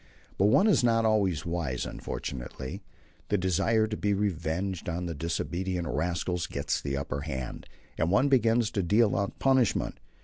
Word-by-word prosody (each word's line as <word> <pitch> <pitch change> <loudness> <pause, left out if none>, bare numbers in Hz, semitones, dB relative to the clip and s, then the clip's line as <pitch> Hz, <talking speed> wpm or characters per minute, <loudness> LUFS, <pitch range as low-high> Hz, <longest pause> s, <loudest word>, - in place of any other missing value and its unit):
But 95 - +5
one 110 - +5
is 205 - +4
not 115 -1 +3
always 100 -7 +2
wise, 85 -7 -2
unfortunately. 65 0 -6 0.5
The 105 - +2
desire 95 +5 +2
to 110 0 -3
be 105 -1 0
revenged 90 -1 -2
on 90 +1 -3
the 85 - -3
disobedient 85 +3 -2
rascals 85 +3 -1
gets 70 - -2
the 70 -1 -2
upper 70 0 -3
hand, 65 -5 -5 0.3
and 80 - +2
one 100 +9 +4
begins 115 -4 +3
to 100 - 0
deal 105 +4 +3
out 100 0 -2
punishment. 130 -3 +2
90 Hz, 160 wpm, -28 LUFS, 80-110 Hz, 0.5 s, But